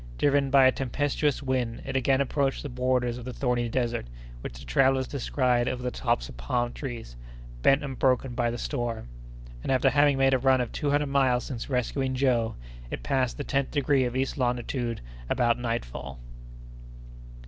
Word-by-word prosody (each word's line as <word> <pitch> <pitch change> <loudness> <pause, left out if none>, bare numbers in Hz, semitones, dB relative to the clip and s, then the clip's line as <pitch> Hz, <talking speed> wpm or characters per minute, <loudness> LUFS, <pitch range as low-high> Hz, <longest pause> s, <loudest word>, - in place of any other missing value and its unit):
Driven 140 -1 +2
by 135 0 +6
a 130 - +7
tempestuous 145 +2 -1
wind, 125 -3 -1
it 135 - -4
again 130 +1 +3
approached 140 0 0
the 145 - -5
borders 125 -1 0
of 120 - -9
the 125 - -5
thorny 120 -2 0
desert, 120 - -1 0.3
which - - -7
the 70 - -11
travellers 130 - +3
descried 125 -3 +1
over 125 -1 -2
the 125 - -1
tops - - 0
of - - -11
palm 120 - -1
trees, 120 - -6 0.5
bent 135 - +4
and 135 -3 -5
broken 130 -1 +2
by 120 -1 +1
the 120 - -3
storm; 120 - -3 0.5
and, - - -2
after 135 +1 +3
having 145 0 +4
made 135 0 +4
a 130 - +3
run 130 0 +4
of 125 -2 -2
two 150 - -2
hundred 145 0 +1
miles 130 -3 +2
since 125 -1 -6
rescuing 130 +1 -1
Joe, 125 -4 +1 0.3
it - - -5
passed 130 -3 0
the 145 - -3
tenth 140 -1 0
degree 140 -2 +2
of 120 0 -3
east 135 +2 -1
longitude 120 -1 -1 0.3
about 120 -1 +2
nightfall. 70 - -4
130 Hz, 180 wpm, -27 LUFS, 120-135 Hz, 0.5 s, a